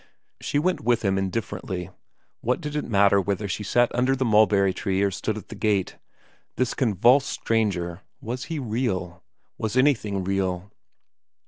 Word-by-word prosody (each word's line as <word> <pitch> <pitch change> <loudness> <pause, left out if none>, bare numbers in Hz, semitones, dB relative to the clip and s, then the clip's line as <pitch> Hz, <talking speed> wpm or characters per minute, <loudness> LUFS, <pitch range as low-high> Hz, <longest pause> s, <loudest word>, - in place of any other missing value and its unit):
She - - -2
went 180 +5 +1
with 120 0 +1
him 95 0 +2
indifferently. 95 -2 -4 0.5
What 125 +2 0
did 150 -3 -5
it 150 - -1
matter 100 -1 +4
whether 100 +2 -2
she 100 - -3
sat 120 +4 +2
under 125 +2 +2
the 130 0 -1
mulberry 105 -3 +4
tree 95 0 -1
or 100 - +2
stood 110 +3 -3
at 105 - -10
the - - -7
gate? 105 -4 0 0.6
This 130 -2 0
convulsed 125 +4 +3
stranger 95 -6 -1 0.2
was 125 +5 -5
he 165 0 -4
real? 105 -8 -2 0.4
Was 110 +2 -2
anything 110 -8 +2
real 95 0 -2
105 Hz, 155 wpm, -25 LUFS, 95-125 Hz, 0.6 s, matter